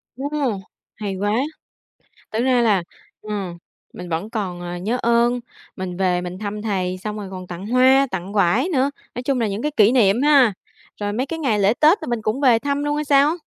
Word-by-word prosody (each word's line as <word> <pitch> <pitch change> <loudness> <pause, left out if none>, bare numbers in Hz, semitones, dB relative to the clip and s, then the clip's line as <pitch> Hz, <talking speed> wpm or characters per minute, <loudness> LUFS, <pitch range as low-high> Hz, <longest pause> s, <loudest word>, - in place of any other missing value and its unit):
Ô! 270 +3 -4 0.7
Hay 205 -3 -4
quá. 205 +2 -1 1.0
Thực 220 +2 0
ra 255 -2 +3
là, 205 -6 +3 0.4
ừm, 200 -5 -5 0.3
mình 180 0 -8
vẫn 170 +6 -3
còn, 190 -6 -4
ờ, 175 0 -5
nhớ 210 +8 -2
ơn, 235 +1 +2 0.4
mình 185 -2 -5
về 180 -1 +1
mình 180 +1 -6
thăm 210 0 -5
thầy, 185 -4 -2
xong 210 +3 -5
rồi 200 -2 -6
còn 185 -1 -7
tặng 180 +2 -7
hoa, 260 +3 +5
tặng 190 +1 -5
vải 210 - +2
nữa. 275 -5 +1 0.2
Nói 245 - -4
chung 260 0 0
là 230 - +1
những 200 +3 -4
cái 300 - 0
kỷ 215 +2 +5
niệm 230 -1 +3
ha. 280 -6 +5 0.5
Rồi 205 0 -2
mấy 250 +6 -1
cái 325 +3 -5
ngày 255 -9 +1
lễ 200 +2 +3
Tết 310 +9 +4
là - - -4
mình 240 -2 -2
cũng 220 +5 -1
về 250 -5 +5
thăm 285 +3 -2
luôn 295 0 0
hay 300 - -1
sao? 285 +3 +4
215 Hz, 215 wpm, -21 LUFS, 190-260 Hz, 1.0 s, hoa